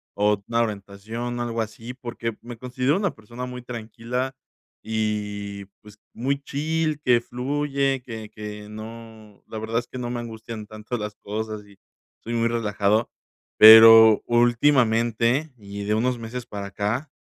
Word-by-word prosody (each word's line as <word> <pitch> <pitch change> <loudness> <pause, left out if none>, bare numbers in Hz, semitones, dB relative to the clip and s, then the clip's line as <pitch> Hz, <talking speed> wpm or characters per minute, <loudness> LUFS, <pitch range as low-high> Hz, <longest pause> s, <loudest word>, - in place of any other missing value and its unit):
o 105 0 +1
una 115 0 +1
orientación, 110 +3 -5
algo 115 -1 -2
así, 115 +2 -6
porque 115 -3 -5
me 120 -1 -9
considero 130 +5 0
una 200 -3 0
persona 120 +4 -8
muy 125 0 -7
tranquila, 120 +2 -5 0.5
y 105 -2 -3 0.2
pues, 105 0 -16
muy 140 +4 -2
chill, 155 +2 -1
que 125 -4 +3
fluye, 135 +1 -1
que 110 -3 -8
que 105 0 -8
no 110 -1 -11
la 110 - -6
verdad 110 +1 -2
es 120 +1 -2
que 130 - -8
no 120 -1 -4
me 120 0 -3
angustian 110 -1 -7
tanto 110 +3 -6
las 105 -1 -5
cosas 110 +1 -5
y 100 -1 -19 0.5
soy 115 - -5
muy 115 0 +2
relajado. 110 -1 0 0.5
Pero 110 0 +10
últimamente, 120 +2 +2
y 100 -1 -8
de 105 +1 0
unos 125 +3 +1
meses 115 +1 -6
para 100 -1 -6
acá, 105 +8 -3
115 Hz, 150 wpm, -24 LUFS, 105-125 Hz, 0.5 s, Pero